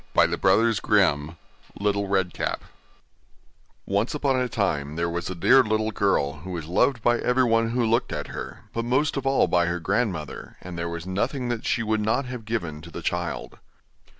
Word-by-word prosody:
LITTLE - - +3
RED 115 +2 +4
CAP 80 -7 +2 0.4
[LITTLE 100 0 0
RED 95 -2 +1
RIDING - - 0
HOOD] - - -4 1.3
Once 100 +7 0
upon 140 -2 +1
a 125 -1 0
time 75 -10 -1
there 85 +1 0
was 85 +1 -3
a 95 - -4
dear 130 +10 +6
little 110 0 0
girl 80 -9 +1
who 85 +5 -10
was 85 -4 -4
loved 115 - +1
by 120 0 +3
everyone 115 -3 +2
who 120 0 +1
looked 115 +1 +1
at - - -4
her, - - -7
but 115 - -1
most 130 +5 +1
of 140 -1 -2
all 135 - +4
by 85 -1 +2
her 90 +1 -1
grandmother, 95 - -2
and 90 -1 -8
there 85 0 -3
was 85 0 -5
nothing 120 +7 -2
that 120 -2 -3
she 115 - +1
would 110 -1 0
not 110 +6 +1
have 125 -3 -7
given 85 -9 -3
to 85 - -11
the 85 - -8
child. 90 +1 -3
105 Hz, 195 wpm, -25 LUFS, 85-120 Hz, 1.3 s, dear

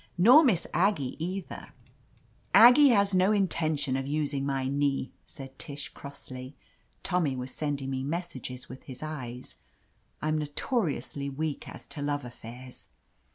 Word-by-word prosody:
Nor 245 - +8
Miss 210 - +2
Ag 200 +4 +3
gie 135 -5 -4
either 185 +2 -5 0.3
— - - -34
" - - -35
"Aggie 285 +4 +7
has 200 -4 +4
no 185 +2 +4
intention 155 -9 +1
of 135 0 -2
using 140 -2 -1
my 135 -1 -1
knee," 140 -1 0 0.2
said 135 -1 -11
Tish 145 -2 -6
crossly. 135 -1 -9 0.5
Tommy 170 -7 +1
was 125 0 -5
sending 145 -3 -2
me 130 0 -2
messages 140 -5 -5
with 130 - -10
his 130 -1 -8
^es. 130 -6 -6 0.6
I'm 155 0 0
notoriously 150 - -2
weak 150 +2 -4
as - - -10
to 145 - -8
love 145 -1 -1
affairs. 125 +1 -10
145 Hz, 150 wpm, -29 LUFS, 135-175 Hz, 0.6 s, Nor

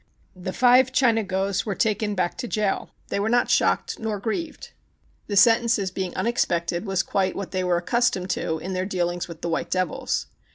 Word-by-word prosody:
The 185 0 -5
five 250 +3 +5
Chinagos 210 -7 +1
were 205 -3 -3
taken 210 +1 0
back 180 -2 -1
to 245 - -4
jail. 210 -3 -1 0.2
They - - -1
were 210 +2 0
not 245 +1 +2
shocked - - +1
nor 220 -2 -3
grieved. 270 - -4 0.6
The 205 - -1
sen 225 +4 +6
tences 200 -5 0
being 190 -2 -3
unexpected 175 -5 0
was 190 -1 +1
quite 190 -2 0
what 200 - -5
they 185 - -1
v/ere 180 -1 +1
accustomed 190 -1 0
to 160 -2 -1
in 185 +4 -5
their 185 0 -2
dealings 175 -2 -2
with 170 -1 -10
the 170 - -2
white 165 - -2
devils. 185 -3 -1
195 Hz, 190 wpm, -24 LUFS, 180-225 Hz, 0.6 s, sen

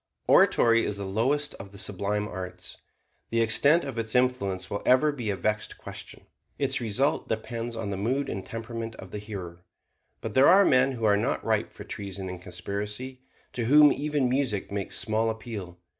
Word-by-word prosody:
Oratory 115 -1 +5
is 100 - -2
the 100 - -4
lowest 130 +10 0
of 100 0 -9
the 100 - -12
sublime 100 +2 -1
arts. 90 -2 -7 0.5
The 115 - 0
extent 140 +9 +4
of 135 -4 -4
its 110 0 -3
influence 125 -7 +1
will 100 - -4
ever 130 +4 +4
be 120 -7 -4
a 100 - 0
vexed 105 +2 -2
question. - - -10 0.3
Its 135 -2 +1
result 125 +7 0
depends 115 +1 -3
on 115 -3 -4
the 95 - -3
mood 130 +8 -1
and 95 - -4
temperament 115 0 -6
of 95 - -11
the 105 - -5
hearer. 90 -5 -8 0.6
But - - -5
there 130 +2 +6
are 195 +3 +7
men 130 +1 +4
who 115 -3 -6
are 100 -1 +4
not - - -1
ripe - - 0
for - - -10
treason 95 -1 -6
and 90 -1 -7
conspiracy, 105 +8 -5 0.3
to 120 - -1
whom 150 +4 +7
even 145 -2 0
music 125 -7 -1
makes 100 -1 -2
small 110 +1 +1
appeal. 110 -6 -6
110 Hz, 185 wpm, -27 LUFS, 100-130 Hz, 0.6 s, are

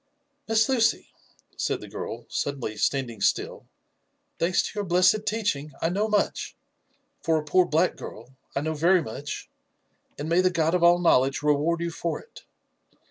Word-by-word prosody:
'* 285 0 -48
" 285 0 -48
Miss 225 0 +3
Lucy 245 -4 +1 0.3
!" - - -35
said - - -1
the - - -10
girl, - - -6
suddenly 135 -6 -3
standing 120 -1 -1
still, - - 0 0.4
" - - -47
thanks 175 +2 +2
to - - -4
your 205 -1 -2
blessed 185 +4 +3
teaching, 195 -10 -1
I 165 - 0
know 205 +5 0
much 210 -2 -1 0.7
for 165 -1 +2
a 155 - -2
poor 180 +4 +3
black 165 +3 +1
girl, 120 +5 -10 0.2
I 140 - 0
know 160 +1 -2
very 170 +3 +3
much, 140 +5 -6 0.7
and 145 - -4
may 170 +2 +3
the 185 - +3
God 165 -2 +1
of 180 - +2
all 175 0 +6
knowledge 135 -5 +2
reward 150 +3 +2
you 170 0 -2
for 170 +1 -3
it. 465 - -16
170 Hz, 185 wpm, -26 LUFS, 145-195 Hz, 0.7 s, all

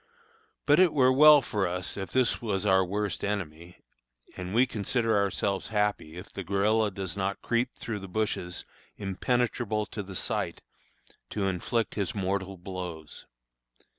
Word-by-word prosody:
But 145 +3 +5
it 185 -4 +5
were 130 -3 +5
well 150 +1 +8
for 105 -5 -1
us 90 +1 -3
if 95 -1 -5
this 130 -2 +1
was 105 -4 -1
our 95 -2 +5
worst 100 -2 -2
enemy, 90 -4 -4 0.5
and 90 +2 -5
we 125 +2 +6
consider 115 0 0
ourselves 100 -1 0
happy 105 -6 -1
if 90 - -10
the 100 - -5
guerilla 105 +4 +2
does 95 -3 -5
not 100 0 -2
creep 120 +2 0
through 105 -4 -5
bushes 90 -3 -2 0.3
impenetrable 110 +2 -1
to 105 0 -6
the 95 -1 -9
sight, - - -2 0.7
to 100 -2 -2
inflict 95 +5 -1
his 100 -1 -2
mortal 95 -1 -2
blows. 90 -4 -7
100 Hz, 145 wpm, -28 LUFS, 95-110 Hz, 0.7 s, well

